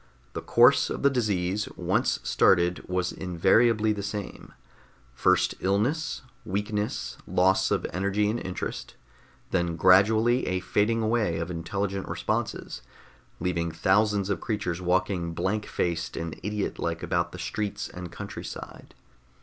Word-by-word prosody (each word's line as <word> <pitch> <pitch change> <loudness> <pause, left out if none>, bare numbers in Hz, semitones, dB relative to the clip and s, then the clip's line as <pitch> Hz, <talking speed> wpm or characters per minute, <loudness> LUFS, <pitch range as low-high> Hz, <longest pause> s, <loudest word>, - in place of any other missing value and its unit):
The - - -4
course 120 +4 +5
of - - -4
the 140 - +5
disease, 100 -5 0
once - - +1
started, 90 -1 +3
was 90 -1 0
invariably 105 +5 +2
the 105 - -4
same: 100 0 -6 0.6
first 60 - +2
illness, 120 +14 0 0.2
weakness, 105 +2 -3
loss 95 +1 +3
of - - 0
energy 100 +3 +1
and 110 +3 -1
interest, 90 0 -5 0.6
then 85 -2 0
gradually 110 +7 +4
a 95 0 0
fading 105 +5 +1
away 110 -7 +1
of 85 +2 -3
intelligent 95 +3 -3
responses, - - -3 0.6
leaving 85 -1 -1
thousands 100 +4 +2
of 95 - -2
creatures 95 -6 -2
walking 90 -2 0
blank 95 +5 -1
faced 85 -2 -2
and 80 -1 -4
idiot 105 +1 -3
like 85 -1 -2
about - - 0
the - - -8
streets 105 -1 -3
and 90 -1 -8
countryside. - - -8
95 Hz, 130 wpm, -27 LUFS, 90-105 Hz, 0.6 s, course